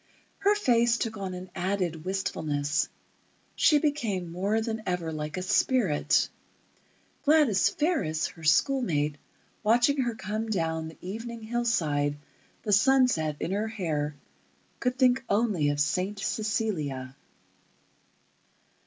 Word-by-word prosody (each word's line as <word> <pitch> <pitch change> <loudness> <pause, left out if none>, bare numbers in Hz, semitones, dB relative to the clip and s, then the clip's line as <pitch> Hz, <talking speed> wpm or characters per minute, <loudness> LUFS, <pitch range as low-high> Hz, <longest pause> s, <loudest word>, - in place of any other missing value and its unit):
Her 410 +1 +3
face 240 - +3
took 225 -2 -2
on 190 -2 -4
an 180 0 -9
added 180 -4 -2
wistfulness; 155 -5 -1 0.7
she 305 - +5
became 230 - -1
more 200 +5 0
than 220 0 -3
ever 180 -3 -1
like 155 +1 -4
a 180 - -2
spirit. 190 - +2 1.0
Gladys 295 -9 +4
Fariss, 280 - 0
her 165 - -14
schoolmate, 155 - +2 0.4
watching 240 +6 +3
her 240 -2 -1
come 215 +2 -4
down 160 -5 -1
the 160 - -11
evening 225 +4 -6
hillside, 165 -12 0 0.5
the 210 - 0
sunset 220 - +3
in - - -3
her 210 +3 0
hair, 155 -9 -2 0.6
could 250 0 -1
think 255 0 +3
only 200 -8 +2
of 145 0 -1
Saint 185 +7 0
Cecilia.... 165 - -2
200 Hz, 120 wpm, -28 LUFS, 160-235 Hz, 1.0 s, she